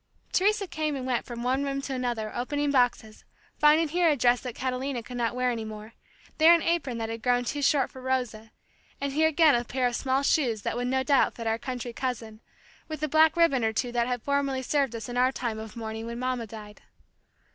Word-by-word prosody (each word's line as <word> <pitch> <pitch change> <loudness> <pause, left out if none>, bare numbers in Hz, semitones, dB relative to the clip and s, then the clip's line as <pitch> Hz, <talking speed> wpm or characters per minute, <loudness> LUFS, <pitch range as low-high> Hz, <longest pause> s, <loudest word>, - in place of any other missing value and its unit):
Teresa 410 +2 +2
came 310 -4 -2
and 260 -2 -4
went 250 -2 -1
from 235 -1 -6
one 260 +3 +1
room 275 -1 -2
to 275 - -4
another 240 -4 -3
opening 285 +4 -1
boxes, 245 -5 0 0.4
finding 305 +2 +5
here 345 +1 +3
a 300 - +3
dress 245 -1 +3
that 250 -3 -6
Catalina 255 -1 -3
could 250 - -9
not 235 0 -1
wear 250 0 +1
any 230 -2 -3
more, 215 +1 -9 0.5
there 325 +2 +8
an 335 - -1
apron 320 -8 0
that 225 -1 -3
had 225 0 -5
grown 245 +1 +1
too 290 +4 -3
short 275 -1 +2
for 260 - -11
Rosa, 245 -4 -2 0.5
and 280 -1 -3
here 315 +2 +3
again 315 -1 +4
a 240 - +1
pair 250 +2 -2
of 245 -1 0
small 265 +2 0
shoes 240 -8 +1
that - - -2
would 245 +1 -2
no 260 +1 +1
doubt 275 -1 +3
fit 230 - -7
our 225 0 0
country 250 -1 -5
cousin, 230 -4 -4 0.5
with 310 -1 -6
a - - +2
black 315 +2 +4
ribbon 280 -8 +3
or 220 0 +1
two 245 +3 -1
that 240 0 0
had 245 -2 -3
formerly 275 -2 0
served 275 -3 0
us 225 -2 -6
in 245 0 -5
our 255 +1 +4
time 235 -4 -4
of 220 +1 -9
mourning 225 0 -5
when 235 0 -5
mamma 250 -2 -2
died. 210 -1 -11
250 Hz, 230 wpm, -27 LUFS, 235-280 Hz, 0.5 s, there